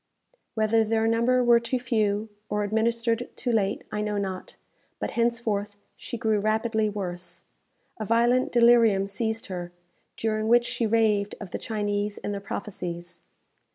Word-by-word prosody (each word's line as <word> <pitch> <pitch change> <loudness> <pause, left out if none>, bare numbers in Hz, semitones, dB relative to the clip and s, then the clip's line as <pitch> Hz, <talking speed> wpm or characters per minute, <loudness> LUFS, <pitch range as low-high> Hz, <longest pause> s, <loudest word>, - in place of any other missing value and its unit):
Whether 220 0 +3
their 220 0 +1
number 235 +3 +3
were 240 -1 +6
too 235 +2 -1
few, 220 -4 0 0.2
or 210 0 0
administered 230 +2 0
too 245 - -1
late, 205 -3 0
I 210 - -2
know 210 -1 -1
not; 190 -2 -4 0.4
but - - -3
henceforth 225 -4 -1 0.2
she 240 - -6
grew 220 -2 +1
rapidly 220 +1 +1
worse. 180 -3 -5 0.6
A 215 - -3
violent 235 +3 +3
delirium 235 -4 +5
seized 220 +2 -2
her, 175 -2 -6 0.5
during 215 -1 -1
which 240 +1 +5
she 230 - -1
raved 210 -2 +2
of 200 -4 -8
the - - -3
Chinese 205 -1 -2
and 205 - -4
their 200 - -4
prophecies. 175 -4 -6
220 Hz, 150 wpm, -26 LUFS, 205-230 Hz, 0.6 s, were